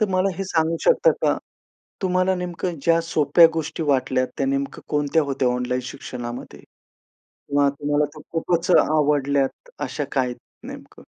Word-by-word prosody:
तर 215 - +2
मला 185 +1 +1
हे 195 - -3
सांगू 165 -2 0
शकता - - +5
का? - - +3 0.7
तुम्हाला 185 0 +2
नेमकं 175 -2 -4
ज्या 165 0 +3
सोप्या 165 +1 +5
गोष्टी 160 0 -3
वाटल्या 130 -2 +2
त्या 135 - 0
नेमकं 140 0 -2
कोणत्या 150 +1 +1
होत्या 135 -2 0
ऑनलाईन 125 +1 -1
शिक्षणामध्ये 120 -1 -7 0.7
किंवा 140 0 0
तुम्हाला 145 +1 +1
त्या 155 - -12
खूपच 170 +1 0
आवडल्यात, 145 - +1
अशा - - -3
काही 125 -3 0 0.3
नेमकं? - - -11
150 Hz, 140 wpm, -23 LUFS, 135-170 Hz, 0.7 s, शकता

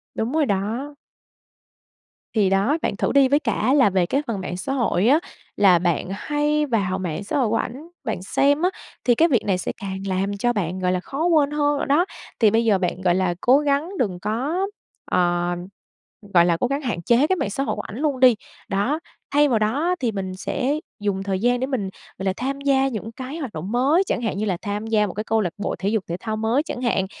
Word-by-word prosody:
Đúng 225 +3 -1
rồi 315 -2 +3
đó. 230 +8 -2 1.4
Thì 205 -4 +3
đó, 200 +11 +2
bạn 200 - -1
thử - - 0
đi, 275 -1 +5
với 285 +3 +3
cả 245 -1 0
là 265 -7 +5
về 185 -2 +2
cái 275 +10 0
phần 210 -5 -2
mạng 180 -1 -4
xã 270 +9 -3
hội 230 -5 +1
á, 295 +5 +5 0.4
là 190 -4 +6
bạn 175 0 0
hay 295 +7 0
vào 200 -8 0
mạng 180 +1 -3
xã 245 - -2
hội 245 -6 +2
của 225 - +1
ảnh 275 +9 -3 0.2
bạn - - -3
xem 285 - +2
á, 365 - +3 0.4
thì 245 - +4
cái 325 +8 +4
việc 250 -9 +2
này 190 -3 +1
sẽ - - -3
càng 190 -1 -4
làm 195 +2 -1
cho 240 +4 +1
bạn, 185 -3 -2
gọi 180 0 +1
là, 180 - 0
khó 275 - -3
quên 305 -5 +3
hơn 295 -1 +1
rồi - - -1
đó. 310 +6 +4 0.3
Thì 220 -3 +5
bây 225 +2 +2
giờ 210 -3 +4
bạn, 180 0 -2
gọi 175 -2 +3
là, 185 -2 +1
cố 260 +4 +5
gắng 290 +2 0
đừng 185 -7 -1
có 275 - -1 0.4
ờ, 175 0 +2 0.8
gọi 170 -1 +6
là, 170 -1 +2
cố 250 - +1
gắng 275 +2 -2
hạn 230 -10 -3
chế 240 - +3
cái 375 - +2
mạng 215 - -2
xã 270 +7 -2
hội - - -1
của 210 - -4
ảnh 215 - -9
luôn 290 -4 0
đi, 250 -3 +7 0.3
đó, 210 +11 0 0.3
thay 290 +1 +4
vào 225 -3 +2
đó 225 +9 0
á 360 +1 +2
thì 235 -3 0
mình 190 -2 -4
sẽ 270 +8 -1 0.3
dùng 195 -2 -1
thời 195 -1 -1
gian 245 +3 +2
để 260 - -1
mình, 230 -8 -2 0.3
gọi 190 - -5
là, 190 - +1
tham 275 +2 -3
gia 270 -1 +3
những 225 -2 -5
cái 260 +6 -7
hoạt 270 -8 -5
động 170 +7 -5
mới, 275 +9 +3
chẳng 245 - -1
hạn 215 -4 -2
như 215 - -1
là 185 -4 0
tham 210 0 -3
gia 210 -2 +2
một 180 - -6
cái 215 - -3
câu 220 0 +1
lạc 175 -4 -2
bộ 205 - -2
thể 195 - 0
dục 215 -2 0
thể 170 - -3
thao 220 -1 -3
mới 225 +6 +1
chẳng 255 -5 -6
hạn. 215 -6 +1
225 Hz, 245 wpm, -23 LUFS, 195-275 Hz, 1.4 s, đi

